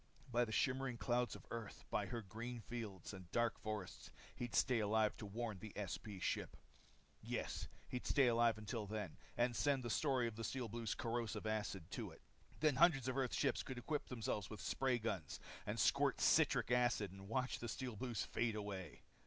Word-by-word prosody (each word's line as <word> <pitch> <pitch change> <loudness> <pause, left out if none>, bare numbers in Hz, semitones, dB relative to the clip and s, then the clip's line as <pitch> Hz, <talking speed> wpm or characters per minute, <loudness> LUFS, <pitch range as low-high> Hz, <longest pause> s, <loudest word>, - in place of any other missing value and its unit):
By 120 +1 +4
the 110 - -6
shimmering 130 +1 +1
clouds 120 +1 +1
of - - -11
Earth, 115 -3 -5
by 105 -2 +1
her 115 +3 -3
green 115 +5 -5
fields, 110 -6 -5
and 95 -3 -9
dark 120 -1 +2
forests, 105 -4 -4 0.3
he'd 120 -1 -3
stay 125 -3 +4
alive 110 0 +3
to 105 - -6
warn 110 -1 -3
the 105 +1 -8
SP 105 +1 -4
ship. - - -1 0.6
Yes, - - -2 0.2
he'd 125 - -4
stay 140 -2 +5
alive 115 -2 +4
till 105 -1 -2
then. 105 -5 -3 0.2
And 120 0 +3
send 140 -1 +2
the 120 - -2
story 130 -3 +3
of 115 - -5
the 115 - -3
Steel 125 +2 -2
Blues' 115 0 -2
corrosive 115 -3 -2
acid 105 -4 -1
to - - -3
it. - - -14 0.4
Then 150 -4 +4
hundreds 145 -6 +6
of 130 - 0
Earth's 135 -3 +1
ships - - +2
could 130 - -6
equip 145 +4 -2
themselves 110 -5 -2
with 110 - -6
spray 130 -2 +1
guns 100 -9 -2 0.3
and - - -1
squirt - - +4
citric - - +4
acid 120 -5 +3
and 95 0 -10
watch 125 +2 0
the 120 - -4
Steel 125 0 -3
Blues 120 -1 -1
fade 115 -2 0
away. 100 -6 -5
115 Hz, 190 wpm, -41 LUFS, 105-125 Hz, 0.6 s, hundreds